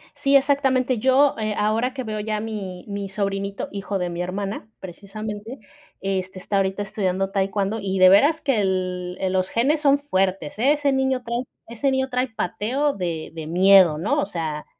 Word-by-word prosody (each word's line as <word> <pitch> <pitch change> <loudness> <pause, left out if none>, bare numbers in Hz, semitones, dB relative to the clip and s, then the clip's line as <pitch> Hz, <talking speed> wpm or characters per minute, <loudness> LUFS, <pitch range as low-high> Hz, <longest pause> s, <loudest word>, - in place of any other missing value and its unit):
Sí, 275 0 +2
exactamente, 265 -3 +2
yo, 265 +3 +4
eh, 215 -1 -1
ahora 220 +5 +1
que 260 -1 -4
veo 215 -2 -4
ya 215 0 -2
a - - -3
mi 200 -5 -6
mi 200 -1 -4
sobrinito, 200 0 -3
hijo 200 0 -3
de 180 -1 -2
mi 170 +1 -4
hermana, 200 +4 -4
precisamente, 210 +5 -7 0.4
este, 190 -1 -3
está 200 +2 -2
ahorita 195 +1 0
estudiando 195 -1 -1
taekwondo, 195 +2 -1
y 195 -1 -2
de 185 0 +8
veras 290 - +5
que 270 -7 +1
el 185 -2 -2
el 190 -1 -1
los 185 0 0
genes 275 +7 +1
son 280 -1 +4
fuertes. 190 - -1
Ese 285 +2 +3
niño 265 -1 0
trae 235 +1 -2 0.2
ese 235 +4 -1
niño 265 0 0
trae 250 +1 0
pateo 245 +5 -1
de 170 -6 -4
de 160 -2 -7
miedo, 185 -2 +6
¿no? 180 +8 0
O - - 0
sea 160 -5 -4
205 Hz, 180 wpm, -23 LUFS, 190-255 Hz, 0.4 s, de